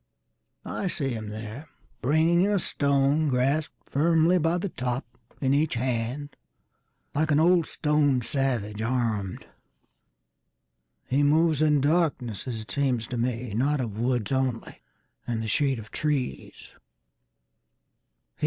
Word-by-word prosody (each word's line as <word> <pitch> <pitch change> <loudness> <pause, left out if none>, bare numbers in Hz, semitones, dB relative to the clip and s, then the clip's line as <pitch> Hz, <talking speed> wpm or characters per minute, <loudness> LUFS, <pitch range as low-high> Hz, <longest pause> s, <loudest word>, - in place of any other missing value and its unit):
I 195 - -3
see 145 -6 -1
him 110 -4 -4
thereBringing 150 - -1
a 205 0 +2
stone 140 -1 +2
grasped 135 +4 -1
firmly 165 +4 +3
by 165 +2 +1
the 190 +2 -3
topIn 125 0 -4
each 150 0 +1
hand, 125 +4 -2 0.8
like 155 +2 0
an 145 -1 +4
old 170 0 +4
stone 150 -4 +1
savage 115 -6 -1
armed. 115 -5 -2 1.6
He 135 +3 +1
moves 155 +1 +3
in 150 -2 +3
darkness 140 - 0
as 115 -3 -4
it 110 - -10
seems 130 -5 0
to 125 - -3
me, 120 -1 -2
Not 140 +6 +1
of 110 -4 -4
woods 120 -2 0
only 130 -3 -2 0.5
and 115 -2 -2
the - - -4
shade 135 +3 +2
of 110 -1 -10
trees. 145 -5 -3
135 Hz, 120 wpm, -26 LUFS, 120-150 Hz, 1.6 s, an